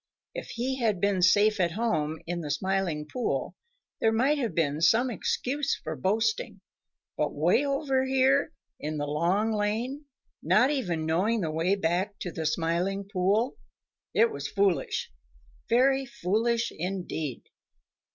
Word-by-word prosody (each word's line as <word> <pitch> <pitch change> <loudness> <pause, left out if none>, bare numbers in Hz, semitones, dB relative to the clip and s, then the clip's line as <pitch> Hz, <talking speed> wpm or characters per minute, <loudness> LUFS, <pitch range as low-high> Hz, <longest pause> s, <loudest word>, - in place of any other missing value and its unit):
If - - -6
he 260 +3 -2
had 215 -6 +1
been 200 -1 +1
safe 205 +4 +4
at 170 -2 +1
home 165 -8 -1
in 175 0 -3
the 150 - -5
Smiling 185 -3 -1
Pool, 245 +10 -2 0.4
there 225 - +3
might 265 +7 +2
have 230 - -2
been 155 -2 0
some 235 +9 +4
excuse 275 +5 -1
for - - -4
boasting, 225 - 0 0.6
but - - -1
way - - +3
over 275 -2 0
here 265 +1 +3 0.3
in 155 +1 -4
the 145 - -2
Long 175 +9 +1
Lane, 225 +8 -2 0.4
not 260 +3 +4
even 175 - -1
knowing 195 +8 +1
the 160 -3 -1
way 165 +5 +1
back 190 +3 -1
to 180 - -3
the 160 -1 -2
Smiling 175 +5 -1
Pool, 205 +7 +1 0.6
it 230 +2 +4
was 140 0 -4
foolish, 200 - 0 0.6
very 265 +3 +3
foolish 235 +2 0
indeed. 175 -6 -4
205 Hz, 140 wpm, -28 LUFS, 170-245 Hz, 0.6 s, safe